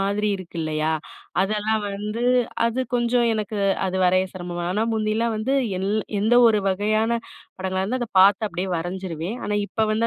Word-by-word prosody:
மாதிரி 200 +2 0
இருக்கு 185 -2 -10
இல்லையா, 155 0 0 0.5
அதெல்லாம் 215 +2 0
வந்து 210 +3 -4 0.4
அது 235 +2 -1
கொஞ்சம் 240 0 +2
எனக்கு 215 0 -3 0.3
அது 185 0 -2
வரைய 185 +1 +4
சிரமமா, 175 -2 -5
ஆனா 215 +4 +1
முந்தில்லாம் 220 +1 0
வந்து 230 +6 0 0.2
எல் 190 - -1 0.3
எந்த 220 +3 +3
ஒரு 215 -2 +2
வகையான 215 +4 +1 0.4
படங்களா 190 0 -1
இருந்தா 250 +6 -2
அத 240 - -3
பார்த்து 200 +3 +5
அப்டியே 180 +2 -3
வரைஞ்சிருவேன். 175 +2 -4
ஆனா, 210 - -1
இப்ப 220 +1 0
வந்து 225 +2 +1
205 Hz, 160 wpm, -23 LUFS, 185-220 Hz, 0.5 s, பார்த்து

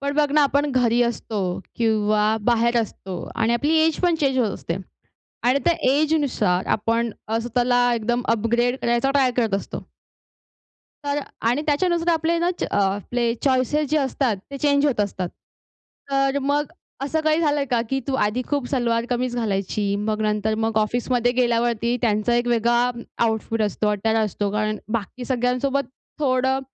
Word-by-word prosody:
पण 280 0 -2
बघ 295 -1 +2
ना 300 0 +5
आपण 285 +1 +1
घरी 245 -2 +2
असतो 230 -3 -2 0.4
किंवा 215 -2 +2 0.2
बाहेर 235 +1 +2
असतो 195 -3 -6 0.2
आणि 230 0 +1
आपली 290 +7 +1
एज 320 -1 +1
पण 350 -2 +3
चेंज 270 -3 +2
होत 230 -5 +2
असते. 170 - -4 0.7
आणि 255 +3 +4
त्या 345 - +4 0.2
एजनुसार 285 - +1
आपण 230 +2 0 0.2
अ, 225 +1 0
स्वतःला 245 +1 +1
एकदम 240 +2 -1
अपग्रेड 235 +3 +1
करायचा 240 +3 +1
ट्राय 275 -2 +3
करत 225 -5 +1
असतो. 195 - -4 1.3
तर 285 +1 0 0.3
आणि 245 +5 +2
त्याच्यानुसार 335 +3 +1
आपले 330 +1 +1
ना 345 +1 +1
च - - -1 0.2
आपले 205 +5 0
चॉइसेस 270 +3 +1
जे 310 - +2
असतात 265 -4 0 0.2
ते 280 - -5
चेंज 285 0 +2
होत 270 -7 0
असतात. 190 -3 -1 0.8
तर 275 0 +2
मग 290 +2 0 0.3
असं 300 +3 -1
काही 310 +1 +2
झालंय 295 -3 +1
का 240 -3 +1
की 270 0 0
तू 275 - -1
आधी 215 +5 -1
खूप 285 -4 -1
सलवार 235 -3 0
कमीज 245 0 -1
घालायची, 200 -2 -1
मग 215 +1 -2
नंतर 215 0 0
मग 225 0 0
ऑफिसमध्ये 245 +2 +1
गेल्यावरती 235 -1 +1
त्यांचा 215 0 +1
एक 240 0 +1
वेगळा 240 +1 +2 0.4
आउटफिट 225 0 -1
असतो, 210 0 0
अटायर 220 +2 0
असतो. 205 0 -2
कारण 215 0 -1 0.2
बाकी 230 +3 -4
सगळ्यांसोबत 255 +2 0 0.4
थोडं 265 -1 +1
240 Hz, 160 wpm, -22 LUFS, 220-275 Hz, 1.3 s, ना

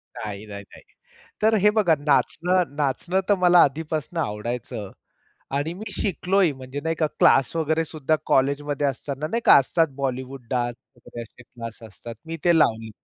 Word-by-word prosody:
नाही, 105 -1 -6
नाही, 100 -1 -8
नाही. - - -15 0.6
तर 220 +1 +4
हे 210 - +7
बघा 205 -7 +3
नाचणं 160 +3 +1
नाचणं 150 +6 0
तर 205 - +5
मला 180 -1 +6
आधीपासून 155 +3 -2
आवडायचं. 105 -3 -4 0.7
आणि 150 +4 -1
मी 210 +3 -7
शिकलोही 190 -3 +1
म्हणजे, 130 +1 -7
नाही 165 +1 -1
का, 155 0 0
क्लास 135 +3 +4
वगैरे 160 0 +1
सुद्धा 155 0 -1
कॉलेजमध्ये 140 +1 +1
असताना, 140 +2 -3
नाही 230 +9 -1
का, - - +8
असतात 160 +4 +2
बॉलिवूड 130 -1 -4
डान्स 120 -1 -1 0.2
वगैरे 120 0 -9
असे 115 +2 -15
क्लास 115 -2 -9
असतात, 115 +3 -10
मी 165 0 -5
ते 175 -1 +5
लावले 110 -5 +1
145 Hz, 160 wpm, -24 LUFS, 125-165 Hz, 0.7 s, का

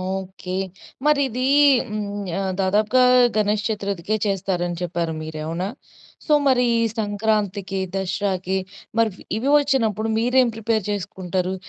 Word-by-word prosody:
Okay. 185 0 -5 0.5
మరి 300 -1 +4
ఇదీ 255 +2 -3 0.4
హ్మ్. 205 -1 -4
ఆహ్, 190 -1 -1
దాదాపుగా 210 +6 +3 0.3
గణేష్ 210 0 +1
చత్రుర్థికే 200 -2 -2
చేస్తారని 180 -3 -1
చెప్పారు 170 -2 -2
మీరే 155 0 -6
అవునా? 170 +4 -2 0.6
సో 305 - +1
మరి 255 -2 +4
ఈ - - +2 0.2
సంక్రాంతికి, 205 -2 -1
దసరాకి 190 -1 -1 0.4
మరి 230 -1 +4
వ్ - - -16 0.2
ఇవి 255 +6 0
వచ్చినప్పుడు 230 -7 +1
మీరేం 250 +2 +3
ప్రిపేర్ 225 -2 0
చేసుకుంటారు? 185 -2 -2
200 Hz, 125 wpm, -22 LUFS, 185-220 Hz, 0.6 s, మరి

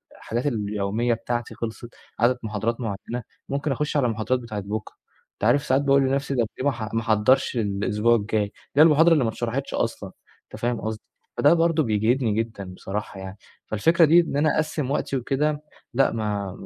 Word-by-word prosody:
الحاجات 120 +4 -4
اليومية 105 0 -1
بتاعتي 120 +1 -3
خلصت، 115 +1 -6 0.3
عدد 125 +2 +3
محاضرات 110 +2 -2
معيّنة، 115 +3 -4 0.3
ممكن 140 +1 -1
أخُشّ 150 +3 -1
على 135 - +2
المحاضرات 115 +3 0
بتاعة 110 -4 -5
بُكرة، 105 +1 -5 0.4
أنت - - -16
عارف 130 +5 +4
ساعات 135 -1 +2
باقول 140 -1 +4
لنفسي 135 +1 0
طَب 115 -3 +1
ليه - - -2
ما 145 - +5
أح 110 -2 -6
ما 115 - +1
أحضّرش 115 +4 +2
الأسبوع 105 +2 +1
الجاي، 110 -1 0
اللي 100 - -3 0.3
هي 150 - +8
المحاضرة 165 +1 +6
اللي 150 -6 +3
ما 115 - +1
أتشرحتش 120 +4 -3
أصلًا، - - -2 0.3
أنت - - -12
فاهم 120 0 -1
قصدي، 110 0 -4 0.4
فده 145 - +5
برضه 165 -2 +2
بيجهدني 110 +1 +1
جدًا 110 -4 -3
بصراحة 100 +1 -5
يعني. 95 +1 -8 0.3
فالفكرة 165 - +3
دي 165 +3 +6
إن 160 -4 0
أنا 155 +1 +2
أقسّم 150 -3 -1
وقتي 140 -2 -1
وكده، 145 +4 -1 0.3
لأ 135 +2 +3
ما 105 -3 -2
120 Hz, 185 wpm, -24 LUFS, 110-140 Hz, 0.4 s, هي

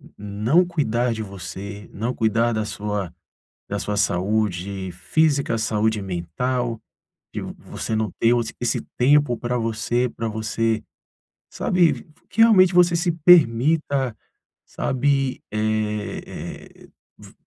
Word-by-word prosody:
não 105 - +2
cuidar 125 -8 0
de 110 -1 -3
você, 100 +1 -8
não 115 +5 -3
cuidar 115 +1 +1
da 110 -1 -1
sua 105 -3 -3 0.6
da - - -3
sua 105 - -3
saúde 95 -1 -1
física, 140 - +1
saúde 110 0 0
mental, 115 +7 -2 0.5
de - - -4
v - - -6
você 110 - -5
não 110 -2 0
ter 115 - +4
o 120 - +2 0.2
esse 120 - 0 0.2
tempo 140 0 +4
pra 125 0 -2
você, 115 +2 0
pra 115 -1 -4
você, 110 +1 -1 0.7
sabe, 175 -3 +2
v - - -6
v - - -25 0.2
que 220 - -2
realmente 190 -5 +6
você 175 -1 +5
se 175 0 +1
permita, 145 -4 +4 0.5
sabe, 135 0 0
eh, 105 -1 -1 0.6
eh - - -16 0.3
v - - -14
115 Hz, 130 wpm, -23 LUFS, 105-135 Hz, 0.7 s, realmente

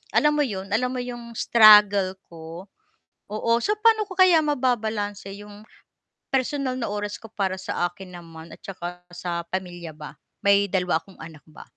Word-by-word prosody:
alam 300 0 +4
mo 295 - +2
'yon, 195 -3 -5
alam 250 +4 +1
mo - - -2
'yong 240 -1 -8
struggle 210 -4 +6 0.2
ko, 165 +3 -10 0.6
oo. 215 +2 -2
So, 420 - 0
paano 440 0 +4
ko 375 - -9
kaya 360 -4 +6
mababalanse 220 -8 -1
'yong 205 +1 -12 0.7
personal 265 0 -1
na 235 -5 -3
oras 205 0 -4
ko 225 -1 -13
para 195 -3 -1
sa 180 -1 -2
akin 180 +1 -12
naman 165 -1 -12
at - - -12
saka 180 -2 -7
sa 175 -1 -5
pamilya 175 -3 -6
ba? 150 -1 -11 0.2
May 200 0 +4
2 180 -4 0
akong 195 +2 -19
anak 160 -2 -12
ba. 155 - -13
205 Hz, 170 wpm, -24 LUFS, 175-240 Hz, 0.7 s, struggle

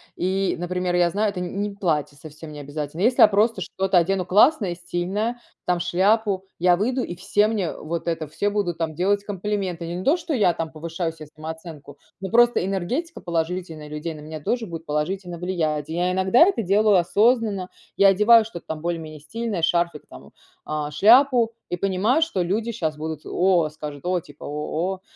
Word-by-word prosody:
и, 190 +1 0
например, 180 +1 -2
я 175 -1 +3
знаю, 210 +3 +1
это 200 -2 -5
не 180 - -3
не 205 +1 -2
платье, 155 -7 -1
совсем 155 +1 -11
не 150 - -9
обязательно. 145 +3 -5
Если 245 +4 +3
я - - +10
просто 210 0 +1
что-то 190 +1 0
одену 185 +2 0
классное 205 - +4
и - - -4
стильное- 190 +7 -3 0.3
там 180 -1 +1
шляпу. 195 +2 +1
Я 175 0 +4
выйду 250 +6 0
и - - -5
все 205 +3 +2
мне 205 -7 -1
вот 170 +2 -5
это, 165 -2 -1
все 200 +6 -1
будут 200 -5 -1
там 160 -2 -3
делать 200 +4 +1
комплименты. 195 -3 -3
Не 175 +2 -4
то, 280 - +3
что 335 -2 -4
я 205 -9 +3
там 165 -1 -4
повышаю 165 +2 -4
се 160 -1 -11
самооценку. 155 -2 -9 0.2
Но 190 - -4
просто 240 -3 +4
энергетика 195 - -3
положительная 165 -2 -3
людей- 150 +2 -5
на 150 - -10
меня 155 +1 -7
тоже 235 +10 -1
будет 165 -4 -8
положительно 175 +4 -3
влиять. 160 -4 -2
Я 175 +3 0
иногда 190 +5 +2
это 385 - 0
делаю 205 +2 +3
осознанно. 205 +1 +2 0.3
Я 200 - +6
одеваю 215 +4 +6
что-то 195 -6 -9
там, 160 -1 -5
более-менее 160 -2 -4
стильное, 225 +4 -4
шарфик, 170 -1 +1
там 65 - -12
вот, - - -19 0.3
а, 150 -1 -3
шляпу 235 - +5 0.2
и - - -1
понимаю, 195 - +1
что 315 - 0
люди 215 +6 -1
щас 160 -9 -2
будут: 155 0 -5
"О!"- 180 -3 +2
Скажут:- 150 -1 -8
"О",- 180 - 0
там - - -13
типа.- 145 -2 -13
О - - -6
о 155 +5 -2
о!" - - -30
180 Hz, 195 wpm, -23 LUFS, 160-205 Hz, 0.3 s, я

